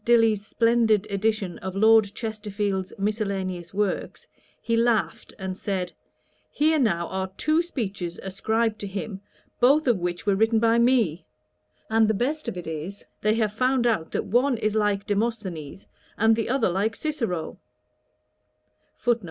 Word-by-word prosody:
Dilly's 225 -3 +4
splendid 225 -2 +2
edition 200 -2 -1
of 190 0 -6
Lord 220 +1 +6
Chesterfield's 210 -4 -3
miscellaneous 195 -4 -2
works, 205 0 -2 0.3
he 230 - -1
laughed, 230 -2 +1
and 190 -1 -4
said, 185 -2 -3 0.6
'Here 310 +1 +2
now 170 -9 +1
are 190 0 -3
two 310 +2 +2
speeches 200 - -4
ascribed 220 +3 -1
to 200 - -5
him, 195 0 -5 0.4
both 280 +5 +5
of 240 -7 +2
which 175 -1 -3
were 200 - +3
written 220 +3 +3
by 230 +1 +3
me: 235 -9 +2 0.6
and 220 0 +3
the 220 - +1
best 290 +8 -1
of - - -3
it 175 - -6
is, 160 +5 -6 0.2
they 215 +1 +2
have 215 -2 0
found 255 +2 +1
out 215 -9 +1
that - - -2
one 245 +4 +2
is 215 -1 0
like 205 -2 +1
Demosthenes, 200 -7 -3 0.3
and 225 +1 +4
the 225 0 -2
other 255 -5 +2
like 205 +4 0
Cicero.' 230 - -3
215 Hz, 145 wpm, -25 LUFS, 190-230 Hz, 0.6 s, Lord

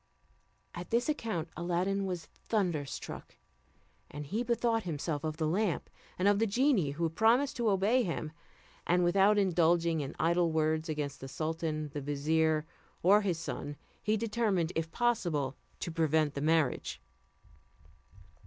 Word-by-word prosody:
At 175 +1 -7
this 235 +2 +1
account, 220 - -2
Aladdin 180 +4 0
was 175 -4 -4
thunderstruck, 175 -11 -3 0.7
and 145 +1 -7
he 210 +11 -2
bethought 235 -1 +1
himself 155 -4 -3
of 155 -1 -3
the 160 - 0
lamp, 185 +3 0 0.3
and 185 - +2
of 205 0 +4
the 225 - +2
genie 235 - +2
who 165 +4 -4
had 165 -1 0
promised 240 +8 +3
to 235 -2 +2
obey 205 +6 +3
him; 165 -6 -3 0.6
and 180 +1 +3
without 195 +4 +4
indulging 170 -4 +3
in 140 - -5
idle 170 0 +2
words 160 +1 0
against 145 -2 -3
the 135 - -6
sultan, 155 +1 -3
the 145 - -3
vizier, 155 +2 +1 0.4
or 200 +4 +6
his 185 -5 0
son, 145 -3 -5 0.3
he 215 +1 +1
determined, 210 -6 0
if 165 0 -1
possible, 170 - 0 0.3
to 170 - -3
prevent 160 -2 +2
the 140 - -4
marriage. 155 -3 +1
170 Hz, 145 wpm, -31 LUFS, 155-205 Hz, 0.7 s, or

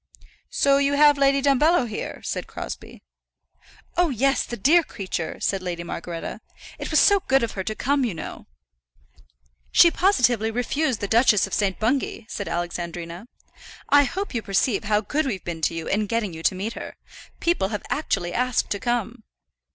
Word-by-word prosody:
"So 275 0 +3
you 280 0 +2
have 290 0 +5
Lady 275 0 +3
Dumbello 285 +1 +3
here?" 215 - -6
said - - -4
Crosbie. - - -8 0.9
"Oh, 350 -1 +3
yes; 270 +2 +1
the 240 - -6
dear 305 - +5
creature!" 190 - -5
said 195 -1 -1
Lady 175 -2 -4
Margaretta. 170 +4 -6 0.4
"It - - -5
was - - +4
so 405 -1 +5
good 270 -1 +3
of 230 - -1
her 190 - -4
to 215 +3 -4
come, 280 +3 +1
you 225 -8 -1
know." 160 - -8 1.2
"She 340 - +7
positively 245 - +2
refused 250 +3 -1
the 200 - -1
Duchess 225 -1 +4
of 195 - -10
St. 195 -3 0
Bungay," 235 0 -1
said 200 -4 -5
Alexandrina. 175 +2 -5 0.6
"I 285 0 +6
hope 385 +9 -4
you 235 - -1
perceive 200 +2 0
how 210 0 +2
good 290 +8 -1
we've 200 -8 -4
been 165 -2 -5
to 165 - 0
you 165 -1 -4
in 210 +1 0
getting 215 -4 -1
you 160 - -8
to 185 - +2
meet 205 +5 -4
her. - - -8 0.4
People 340 - +1
have 210 0 -4
actually 195 - -1
asked 250 0 0
to 200 - -1
come." 240 -1 -2
230 Hz, 175 wpm, -24 LUFS, 195-275 Hz, 1.2 s, She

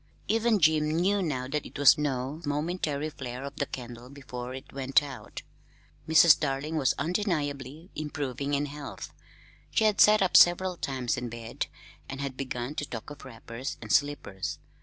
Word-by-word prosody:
Even 225 -1 +2
Jim 155 -2 +4
knew 185 +6 +2
now 130 -7 -2
that 150 +2 -2
it - - -10
was 145 -1 +7
no 145 0 -2
momentary 150 0 -2
flare 125 -2 -6
of 140 0 -7
the 140 - -1
candle 120 -1 -8
before 130 -2 -7
it 130 - -10
went 135 +1 +2
out. 140 -3 -8 0.7
Mrs. 160 0 +7
Darling 145 +2 -2
was 140 -4 +2
undeniably 155 - -2
improving 145 -2 -3
in 145 +1 0
health. 145 0 -8 0.6
She - - +1
had 215 -2 +4
sat 210 -1 +7
up 185 - 0
several 180 +1 +6
times 130 -7 -2
in 120 -1 -4
bed, 115 0 -5 0.4
and 135 - -6
had 140 -2 -4
begun 130 0 -4
to 145 - -1
talk 115 +4 -7
of 145 - -10
wrappers 120 0 -7
and 110 -2 -7
slippers. 120 - 0
145 Hz, 165 wpm, -28 LUFS, 130-155 Hz, 0.7 s, was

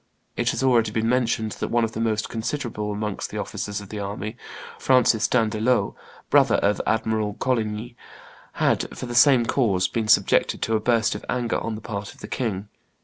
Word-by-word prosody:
It - - 0
has - - -1
already 120 -4 +3
been 110 +1 -1
mentioned 115 -3 +1
that - - -1
one 120 0 +1
of 110 - -1
the 110 - -6
most 110 -1 0
considerable 115 -3 -3
amongst 105 -1 -3
the - - -6
officers 105 0 -4
of 100 - -12
the 105 - -5
army, 100 +2 -5 0.4
Francis 120 -3 +3
d'Andelot, 115 +1 +1 0.4
brother - - +5
of 100 +1 +1
Admiral 110 -2 0
Coligny, 115 -2 -2 0.6
had, - - 0
for - - -5
the 120 - -6
same 125 0 +6
cause, 100 -8 +1
been 110 +4 -2
subjected 110 - +3
to 115 - +1
a - - +2
burst 115 0 +2
of 105 - -7
anger 120 -2 0
on 115 -1 -4
the 110 - -8
part 105 -2 -6
of - - -21
the - - -8
king. 105 -6 -3
110 Hz, 190 wpm, -24 LUFS, 105-120 Hz, 0.6 s, same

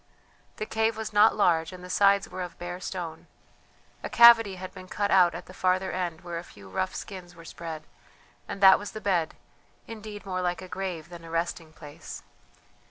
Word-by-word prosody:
The 215 - -3
cave 220 0 0
was 220 -1 -5
not 210 +2 +6
large, 165 -5 +2
and 180 -1 -11
the - - -8
sides 200 +1 +4
were 185 - -7
of 180 -2 -6
bare 175 +1 -6
stone. 175 -3 -6 0.7
A - - -5
cavity 230 -4 +7
had 185 0 -8
been 185 - -11
cut 205 +2 -1
out 180 -3 +5
at - - -7
the 185 - -13
farther 185 0 +1
end 175 -3 -3
where 175 -1 -5
a - - -8
few 100 - -15
rough 185 - -2
skins 180 -3 -8
were 165 0 -13
spread, 165 -2 -7 0.6
and 195 - -6
that 190 -1 +8
was 205 - -7
the 215 - -5
bed, 180 -6 0 0.5
indeed 215 -2 -9
more 185 -1 -2
like 180 +1 -2
a - - -8
grave 180 -4 -5
than 170 -1 -11
a 165 - -10
resting 165 -1 -3
place. 150 -2 -10
185 Hz, 200 wpm, -27 LUFS, 170-200 Hz, 0.7 s, that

